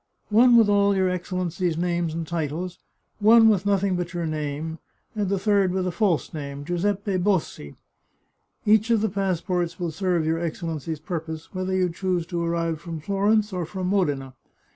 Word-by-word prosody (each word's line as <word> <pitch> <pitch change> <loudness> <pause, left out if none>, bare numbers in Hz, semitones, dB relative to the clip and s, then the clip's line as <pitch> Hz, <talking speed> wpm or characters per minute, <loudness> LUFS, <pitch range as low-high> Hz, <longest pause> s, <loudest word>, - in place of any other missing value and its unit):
One 235 +3 +6
with 225 -2 +6
all 200 -1 +3
your 190 -1 +2
Excellency's 180 -1 -2
names 175 -1 0
and 165 0 -3
titles, 170 +2 -3 0.4
one 225 +1 +7
with 205 -2 +1
nothing 200 -1 +2
but 175 0 -4
your 170 -1 -1
name, 155 +1 -4 0.4
and 205 -3 -1
the 200 - +1
third 200 -1 +2
with 185 0 -1
a 180 - -1
false 175 -2 0
name, 140 -2 -6
Giuseppe 195 +3 -1
Bossi. 180 - -1 0.9
Each 215 +2 +4
of 230 -3 +3
the 220 - +1
passports 185 -3 -1
will 175 -2 -2
serve 175 -1 0
your 160 +1 0
Excellency's 165 -2 -4
purpose, 160 0 -6
whether 185 0 -2
you 185 -1 +2
choose 180 0 -2
to 170 0 -3
arrive 165 -2 -1
from 165 -2 -6
Florence 205 +4 +1
or 180 -1 -2
from 180 +2 -4
Modena. 145 -9 0
180 Hz, 170 wpm, -24 LUFS, 165-200 Hz, 0.9 s, one